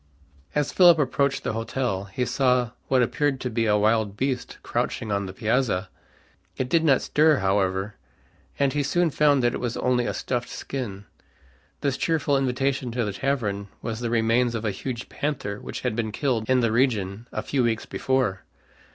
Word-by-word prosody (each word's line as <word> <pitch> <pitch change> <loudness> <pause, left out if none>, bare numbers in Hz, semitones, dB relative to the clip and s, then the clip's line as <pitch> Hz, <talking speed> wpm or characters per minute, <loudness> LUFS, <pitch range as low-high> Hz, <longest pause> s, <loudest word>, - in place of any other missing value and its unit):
As 150 -1 +1
Philip 175 -3 +7
approached 140 -1 +1
the - - -2
hotel 115 -3 -2
he 100 +6 -2
saw 125 -1 +2 0.2
what 130 -2 +3
appeared 140 +3 0
to 125 - -3
be 115 0 0
a 105 0 +4
wild 105 -1 +1
beast 130 0 -2
crouching 110 - -2
on 100 -1 -1
the - - -6
piazza. 105 -2 0 0.7
It 125 - -2
did 165 +1 +3
not 140 -5 +4
stir, 155 -1 +4
however, 95 +1 0 0.6
and 140 -1 +2
he 145 - +1
soon 170 +4 +1
found 145 -3 +3
that 120 - +2
it - - -3
was 120 -1 -3
only 125 -1 +1
a - - -1
stuffed 125 -2 -2
skin. 105 -7 -5 0.8
This 140 -2 0
cheerful 155 -3 +1
invitation 135 0 0
to 120 -2 0
the 105 - -3
tavern 105 -6 -1 0.2
was 115 -1 -3
the 120 -1 -2
remains 115 +1 +2
of 115 0 -3
a 105 - +1
huge 120 +5 -5
panther 130 -9 -3
which - - -7
had - - -1
been 110 -2 -2
killed 120 -3 -1
in 130 -1 +4
the 115 -2 +2
region 115 -3 0
a - - -3
few 140 - 0
weeks 115 -2 0
before. 125 -8 0
125 Hz, 185 wpm, -25 LUFS, 110-135 Hz, 0.8 s, Philip